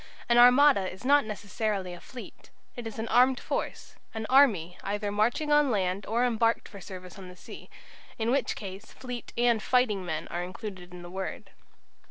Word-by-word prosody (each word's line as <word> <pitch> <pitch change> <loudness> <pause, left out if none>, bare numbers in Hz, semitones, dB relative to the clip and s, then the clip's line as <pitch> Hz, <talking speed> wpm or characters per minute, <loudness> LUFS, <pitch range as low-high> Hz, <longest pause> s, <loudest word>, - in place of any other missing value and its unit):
An 240 0 +4
"armada" 250 -5 +6
is 190 +6 -12
not 285 0 +4
necessarily 205 -2 -3
a 175 - -9
fleet. 250 - -12 0.3
It 240 -2 -6
is 220 - -8
an 225 +1 -3
armed 255 +1 +4
force, - - -4 0.2
an 220 0 -3
"army" 205 - +4
either 205 +1 -2
marching 235 +9 0
on 295 -1 +4
land 195 -3 -1
or 235 +3 +1
embarked 230 -1 +1
for 200 -3 -12
service 185 0 -10
on 185 -1 -10
the 180 - -12
sea, - - -12 0.5
in 225 +1 0
which 275 +1 0
case 195 +1 -9
fleet 250 -2 -7
and 235 -2 +3
fighting 230 -7 +1
men 160 -3 -4
are 175 - -3
included 185 -1 -8
in 180 -1 -10
the 175 - -10
word. 190 +1 -6
215 Hz, 185 wpm, -28 LUFS, 185-245 Hz, 0.5 s, armada